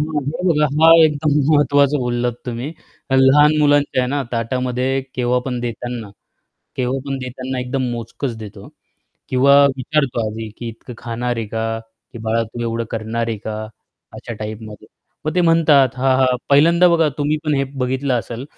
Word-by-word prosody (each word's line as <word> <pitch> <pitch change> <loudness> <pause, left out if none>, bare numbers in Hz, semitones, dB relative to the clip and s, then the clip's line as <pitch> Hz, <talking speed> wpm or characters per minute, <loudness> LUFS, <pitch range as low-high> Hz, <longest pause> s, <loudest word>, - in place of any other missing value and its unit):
हं, 150 -1 -2
हे 165 +4 -4
बघा, 150 -2 +3
हा 160 0 +7
एकदम 150 0 +1 0.2
महत्त्वाचं 145 -1 +3
बोललात 120 -1 -1
तुम्ही. 120 +1 -4 0.5
लहान 145 +3 +5
मुलांच्या 145 -2 +3
आहे 125 - -1
ना, 145 0 -1
ताटामध्ये 125 +3 -1
केव्हा 125 0 +1
पण 125 -2 -3
देताना, 120 -2 -5 0.7
केव्हा 130 +1 -1
पण 135 - -2
देताना 130 0 -5
एकदम 130 +2 -2
मोजकंच 120 +1 -5
देतो 105 -2 -10
हा, - - -12 0.6
किंवा 135 +2 +4 0.2
विचारतो 130 -2 -1
आधी, 110 0 -6
की 120 - -6
"इतकं 115 +2 -10
खाणार 120 +1 -3
आहे 115 -1 -3
का? 115 0 -2 0.3
की 115 - -9
बाळा 115 +1 +1
तू 115 +2 -8
एवढं 115 0 -2
करणार 115 +1 -3
आहे 115 - -2
का?" 110 - -4 0.6
अशा 120 - -8
टाईपमध्ये. 110 -1 -8 0.4
मग 155 +2 -2
ते 180 - +2
म्हणतात, 160 -5 +4
"हां, 130 0 +2
हां." 130 -1 +3
पहिल्यांदा 170 +5 +5
बघा 165 -2 +3
तुम्ही 145 +1 +1
पण 150 -1 +1
हे 135 - +1 0.2
बघितलं 130 +1 -1
असेल, 120 +2 -4
130 Hz, 170 wpm, -19 LUFS, 115-145 Hz, 0.7 s, हा